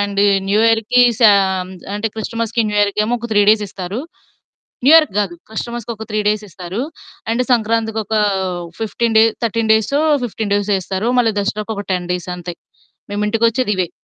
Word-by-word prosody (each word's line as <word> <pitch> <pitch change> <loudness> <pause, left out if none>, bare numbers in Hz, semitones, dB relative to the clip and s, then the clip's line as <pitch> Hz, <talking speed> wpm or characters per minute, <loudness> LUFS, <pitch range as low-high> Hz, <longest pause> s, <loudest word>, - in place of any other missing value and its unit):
And 200 0 0 0.3
new 210 +2 +3
ఇయర్‌కి 225 +2 +3 0.2
శాం 190 -4 +4 0.3
అంటే 210 +2 -2
క్రిస్టమస్‌కి 230 +1 -2
new 210 - -2
ఇయర్‌కేమో 210 +3 +1
ఒక 235 +1 -6
3 205 0 +4
డేస్ 215 0 +5
ఇస్తారు. 190 +5 -5 0.9
న్యూయర్‌కి 310 -6 +6
గాదు. 190 -4 -2
క్రిస్టమస్‌కి 235 +1 -5
ఒక 220 - -8
3 215 - 0
డేస్ 210 0 0
ఇస్తారు. 180 +5 -6 0.5
అండ్ 250 +2 +1
సంక్రాంతికొక 220 -2 0 0.7
15 225 +1 -1
డే 220 - +7 0.2
13 225 -1 +1
డేసో, 220 +7 +1 0.2
15 215 -2 -4
డేసో 205 0 +1
ఇస్తారు. 195 +5 -2
మళ్ళీ 225 -3 +2
దసరాకొక 205 0 -3
10 180 -1 -3
డేస్ 180 0 -5
అంతే. 175 0 -7 0.6
మేము 205 +1 -2
ఇంటికొచ్చేదివే. 220 -4 +1
215 Hz, 150 wpm, -18 LUFS, 200-230 Hz, 0.9 s, డే